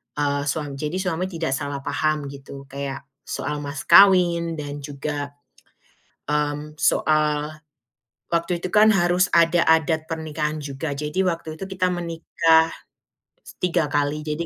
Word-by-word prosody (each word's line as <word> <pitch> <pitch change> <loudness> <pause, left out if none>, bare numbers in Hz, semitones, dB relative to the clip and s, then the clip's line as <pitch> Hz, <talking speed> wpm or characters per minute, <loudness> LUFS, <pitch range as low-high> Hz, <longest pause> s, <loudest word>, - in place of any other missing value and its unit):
eee, 145 -1 0
suam 145 -1 -3
jadi 150 +4 -3
suami 180 -1 -1
tidak 165 -5 -3
salah 140 -1 -4
paham 145 0 -1
gitu 140 0 -10
kayak 140 -2 -5 0.3
soal 150 - -3
mas 145 -1 -6
kawin 175 -4 +5
dan 145 -1 -6
juga, 145 0 -5 0.9
mmm, 150 0 -2
soal 150 -1 +2 0.8
waktu 170 +1 0
itu 185 - -3
kan 215 +1 +6
harus 180 -1 +2
ada 170 +1 +4
adat 160 0 +3
pernikahan 155 -1 -3
juga. 145 +1 -5
Jadi 150 +6 -1
waktu 165 -3 -3
itu - - -3
kita 185 -1 0
menikah 165 -1 +2 0.9
3 170 -4 +1
kali, 145 +1 0
jadi, 155 +2 -3
155 Hz, 135 wpm, -23 LUFS, 145-170 Hz, 0.9 s, kan